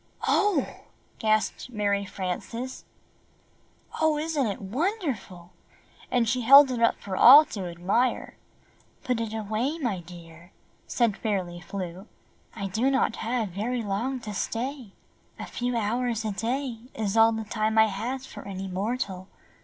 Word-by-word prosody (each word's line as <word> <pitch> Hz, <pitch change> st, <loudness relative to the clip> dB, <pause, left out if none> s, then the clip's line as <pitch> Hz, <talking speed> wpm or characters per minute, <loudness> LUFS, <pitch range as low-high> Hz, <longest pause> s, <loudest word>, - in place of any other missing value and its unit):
"Oh," 400 Hz, -10 st, +2 dB, 0.4 s
gasped 215 Hz, +2 st, 0 dB
Mary 200 Hz, -3 st, 0 dB
Frances, 200 Hz, +7 st, -5 dB, 1.2 s
"Oh, 315 Hz, -1 st, +3 dB
isn't 300 Hz, -4 st, 0 dB
it 200 Hz, -, -3 dB
wonder 315 Hz, -, -1 dB
ful?" 180 Hz, -5 st, -13 dB, 0.6 s
and 240 Hz, -2 st, +2 dB
she 250 Hz, +3 st, 0 dB
held 275 Hz, +3 st, +8 dB
it 240 Hz, -2 st, -2 dB
up 230 Hz, -, +3 dB
for 195 Hz, -2 st, -5 dB
all 280 Hz, +10 st, +9 dB
to 195 Hz, -4 st, -4 dB
admire. 195 Hz, +9 st, 0 dB, 0.7 s
"Put 250 Hz, -3 st, -1 dB
it 225 Hz, -2 st, -3 dB
away, 220 Hz, +7 st, -2 dB
my 235 Hz, -, -2 dB
dear," 170 Hz, 0 st, -13 dB, 0.3 s
said 235 Hz, -5 st, +1 dB
Fairly 185 Hz, -5 st, -2 dB
Flew. 185 Hz, +1 st, -6 dB, 0.5 s
"I 200 Hz, -, -4 dB
do 220 Hz, +7 st, +1 dB
not 265 Hz, -4 st, +1 dB
have 230 Hz, -2 st, -2 dB
very 225 Hz, +6 st, -2 dB
long 225 Hz, +6 st, -2 dB
to 210 Hz, -2 st, -6 dB
stay. 240 Hz, +1 st, -4 dB, 0.4 s
A -, -, -6 dB
few 245 Hz, 0 st, -2 dB
hours 230 Hz, +1 st, -1 dB
a 215 Hz, -, -1 dB
day 235 Hz, +4 st, -3 dB, 0.2 s
is 215 Hz, -2 st, -2 dB
all 225 Hz, 0 st, +6 dB
the 220 Hz, 0 st, -3 dB
time 220 Hz, 0 st, -1 dB
I 220 Hz, -, +7 dB
have 235 Hz, +6 st, -4 dB
for 210 Hz, -6 st, -10 dB
any 195 Hz, 0 st, -5 dB
mortal. 190 Hz, -1 st, -3 dB
225 Hz, 145 wpm, -26 LUFS, 195-250 Hz, 1.2 s, all